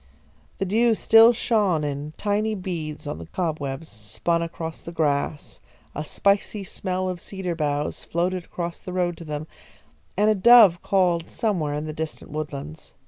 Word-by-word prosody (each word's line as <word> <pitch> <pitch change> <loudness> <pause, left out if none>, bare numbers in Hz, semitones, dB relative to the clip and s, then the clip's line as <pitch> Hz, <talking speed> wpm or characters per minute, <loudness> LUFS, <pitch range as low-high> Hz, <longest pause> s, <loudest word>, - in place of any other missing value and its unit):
The 195 - -1
dew 225 +4 +3
still 225 +2 +7
shone 210 -9 +1
in 145 +1 -4
tiny 215 +1 0
beads 165 -6 -5
on 145 - -5
the 85 - -9
cobwebs, 155 -4 -3
spun 110 +11 -2
across 165 -1 -5
the 170 - -8
grass, 150 -2 -1 0.3
a 150 - -4
spicy 200 +4 0
smell 185 0 -3
of 180 -2 -4
cedar 190 -3 -4
boughs 150 -2 -2
floated 175 +1 -1
across 170 -1 -5
the 185 - -8
road 175 -1 0
to 165 - -9
them, 150 0 -4 0.7
and 210 +2 +3
a 215 - +5
dove 210 -4 +7
called 180 -4 +1
somewhere 170 -10 -1
in 150 +1 -3
the 155 - -5
distant 160 0 -6
woodlands. 150 0 -6
170 Hz, 160 wpm, -24 LUFS, 150-195 Hz, 0.7 s, still